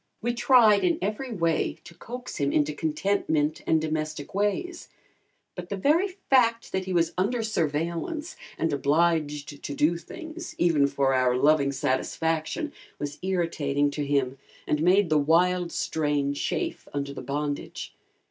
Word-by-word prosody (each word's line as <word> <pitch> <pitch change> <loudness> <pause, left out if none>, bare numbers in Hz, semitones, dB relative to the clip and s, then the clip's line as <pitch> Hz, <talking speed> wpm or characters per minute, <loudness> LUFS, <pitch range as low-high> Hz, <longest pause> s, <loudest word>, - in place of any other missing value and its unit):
We 240 +2 -1
tried 235 -4 +5
in 340 -3 +2
every 250 0 -3
way 165 -5 0
to - - -12
coax 245 +8 -8
him 140 -1 +1
into 150 0 +1
contentment 155 -1 0
and 160 - +4
domestic 155 -1 -3
ways, 210 - -1 0.6
but 180 -1 -8
the 200 - -3
very 310 - +3
fact 255 -11 +1
that 190 0 -2
he 190 - -4
was 170 -2 +2
under 225 +5 +1
surveillance 170 - -2 0.2
and 165 - 0
obliged 150 0 0
to 145 - -4
do 160 +4 +2
things, 335 - -9
even 160 -5 +3
for 140 -1 +1
our 125 -1 +3
loving 140 0 +3
satisfaction, 160 - -1 0.2
was 145 0 -5
irritating 155 -6 0
to 145 +1 -3
him 135 -2 0 0.3
and 150 - 0
made 180 +1 +4
the 155 - +5
"wild 175 +3 +2
strain" 145 -3 0
chafe 145 - -3
under 140 -1 -3
the - - -7
bondage. 145 +2 -4
160 Hz, 150 wpm, -26 LUFS, 145-205 Hz, 0.6 s, tried